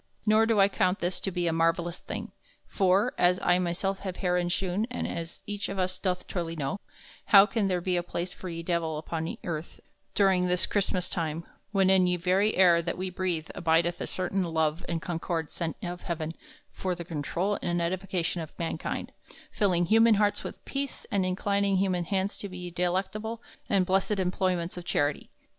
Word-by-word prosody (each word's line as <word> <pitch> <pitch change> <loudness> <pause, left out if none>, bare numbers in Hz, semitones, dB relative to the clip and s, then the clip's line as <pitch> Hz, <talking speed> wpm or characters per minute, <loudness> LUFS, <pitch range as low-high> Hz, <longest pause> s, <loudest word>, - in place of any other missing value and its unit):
Nor 215 +1 +5
do 225 -2 +3
I 195 - +7
count 185 -1 +1
this 175 +1 -1
to - - -2
be 175 -2 -2
a 165 - +1
marvellous 165 +1 +1
thing; - - -6 0.3
for, 195 +5 +2
as 180 +1 +4
I 180 - +4
myself 185 +2 -1
have 190 -2 -5
herein 180 -1 +1
shewn 190 +4 0
and 250 - -3
as 165 0 -6
eche 205 0 -3
of 195 - -4
us 185 0 -1
doth 180 -2 -1
truly 170 -2 -3
know, 155 +6 -2 0.5
how 200 -1 +8
can 215 -2 0
there 180 -2 0
be 180 0 0
a - - +2
place 175 +1 -4
for 185 - -7
ye 165 0 -5
Divell 165 -2 -1
upon 160 +1 -4
earth 160 -1 -5 0.4
during 190 -3 +4
this 180 0 +3
Chrystmass 185 -3 0
time 165 0 -3 0.3
when 195 -2 +4
in 185 -1 +5
ye 180 - +2
very 190 +5 +2
air 175 -3 +6
that 170 0 -3
we 185 0 -3
breathe 180 -3 -2
abideth 165 +1 +1
a - - -2
certain 185 +1 -1
love 160 -1 0
and 170 -1 -2
concord 165 -2 -2
sent 165 -2 -3
of 175 0 -4
heaven 165 -2 -3 0.4
for 185 -1 -2
the 170 -1 -7
controul 170 +5 -1
and 175 0 0
edification 180 0 -1
of 160 - -9
mankind, 165 -1 -3 0.4
filling 180 -5 +2
human 225 +3 +6
hartes 205 0 +2
with - - -8
peace 275 -1 -4
and 195 -2 +2
inclining 200 +1 +1
human 185 -2 +1
hands 195 +2 -1
to 205 - -4
ye 180 -2 -7
delectable 190 +6 -1 0.3
and 195 -5 +3
blessed 195 +2 +1
employments 180 -1 0
of 175 - -5
charity? 145 -4 0
180 Hz, 190 wpm, -28 LUFS, 170-195 Hz, 0.5 s, how